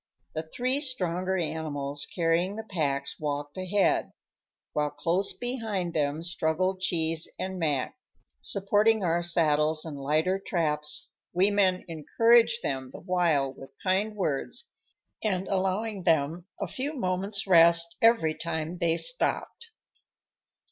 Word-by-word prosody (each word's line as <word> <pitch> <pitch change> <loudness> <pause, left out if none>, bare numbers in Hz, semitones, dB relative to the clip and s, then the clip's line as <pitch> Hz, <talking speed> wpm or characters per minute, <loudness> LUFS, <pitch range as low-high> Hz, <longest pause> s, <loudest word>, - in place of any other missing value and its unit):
The 155 - -2
three 255 +3 0
stronger 190 - -1
animals 150 -4 -2
carrying 175 +3 0
the 220 - -5
packs 140 -9 -2
walked 145 -1 -3
ahead, 190 +2 +1 0.6
while 150 0 +1
close 170 +7 0
behind 220 -8 -3
them 150 +1 -1
struggled 175 +3 -1
Cheese 165 -3 0
and 190 0 -4
Mac, 150 - 0 0.5
supporting 205 +2 +2
our 170 -1 +1
saddles 155 -2 +2
and 155 -3 -6
lighter 155 +7 +1
traps, 150 -4 -1 0.2
we 190 +3 +3
men 190 -3 +2
encouraging 230 +8 +3
them 130 -1 -2
the - - -9
while 170 -7 +1
with 135 0 -13
kind 200 +3 +1
words 190 - -2 0.5
and 190 -3 0
allowing 195 +2 -1
them 165 +1 +1
a 200 - -1
few 270 - -4
moments' 195 -2 -2
rest 170 -2 +5
every 225 -9 +4
time 160 0 -3
they 170 -2 +1
stopped. - - -1
175 Hz, 125 wpm, -28 LUFS, 155-200 Hz, 0.6 s, rest